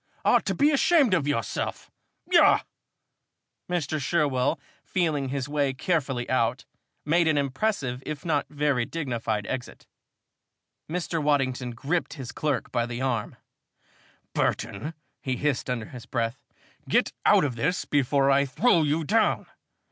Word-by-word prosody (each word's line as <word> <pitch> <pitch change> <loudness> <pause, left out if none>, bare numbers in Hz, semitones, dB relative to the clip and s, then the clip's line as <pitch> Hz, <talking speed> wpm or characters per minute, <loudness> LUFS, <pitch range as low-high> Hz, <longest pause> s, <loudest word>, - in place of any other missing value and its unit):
Ought - - +4
to - - 0
be 290 +2 +4
ashamed 300 - +4
of 160 -6 +1
yourself. 115 -8 -2 0.4
Yah!" - - +6 1.1
Mr. 155 -4 -1
Sherwell, 140 -4 +1 0.2
feeling 155 -7 0
his 135 0 -2
way 145 -2 0
carefully 135 -6 -1
out, 125 -3 0 0.4
made 165 +3 +3
an 155 -2 +3
impressive 135 - -1
if 155 0 -6
not 150 -4 0
very 145 -4 +1
dignified 115 -8 -3
exit. 130 +2 -6 1.0
Mr. 170 -1 -2
Waddington 130 -4 0
gripped 155 +8 -1
his 130 -5 -7
clerk 150 -4 -2
by 120 0 0
the 120 0 -5
arm. 130 -5 -1 1.0
"Burton," 115 +8 -1 0.3
he 130 -1 -1
hissed 140 0 -1
under 120 -3 -2
his 125 0 -11
breath, 115 0 -2 0.5
"get - - +2
out - - +5
of 135 -5 -1
this 180 +11 -1
before 140 -1 +2
I 140 +1 +4
throw 170 - +3
you 155 +2 +1
down! 215 +6 +2
140 Hz, 135 wpm, -26 LUFS, 125-160 Hz, 1.1 s, Yah